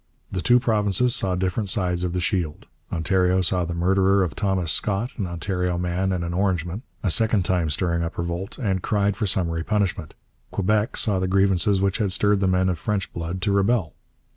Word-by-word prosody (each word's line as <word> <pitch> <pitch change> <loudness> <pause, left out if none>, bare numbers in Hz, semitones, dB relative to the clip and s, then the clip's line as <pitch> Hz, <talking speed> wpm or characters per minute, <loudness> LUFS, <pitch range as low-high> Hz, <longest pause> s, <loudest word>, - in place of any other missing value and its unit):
The 95 - -2
two 120 +4 +4
provinces 110 0 +1
saw 95 -7 +1
different 95 +3 -1
sides 90 -2 0
of 90 -1 -2
the 90 - -1
shield. 85 -3 -2 0.3
Ontario 90 +2 +1
saw 90 0 +1
the 85 0 -4
murderer 95 +2 +3
of 80 -8 -3
Thomas 95 -3 0
Scott 105 - -1
an 100 -6 -2
Ontario 90 +1 -2
man 90 +2 -1
and 90 -2 -1
an 85 0 -3
Orangeman 90 0 -1 0.2
a 95 - +2
second 110 -1 +3
time 90 -3 +1
stirring 85 +2 0
up 85 - -5
revolt, 85 +3 -4
and 95 -6 -1
cried 100 0 0
for 105 +1 -1
summary 85 -5 0
punishment. 100 -5 -1 0.3
Quebec 105 +3 0
saw 100 -4 +1
the 95 - -1
grievances 95 +1 +2
which 100 +3 0
had 100 -4 0
stirred 105 +1 +2
the 95 - +1
men 95 0 +2
of 90 -3 -1
French 100 +2 -2
blood 85 +2 -4
to 100 - +1
rebel. 100 -3 +1
95 Hz, 195 wpm, -23 LUFS, 90-100 Hz, 0.3 s, two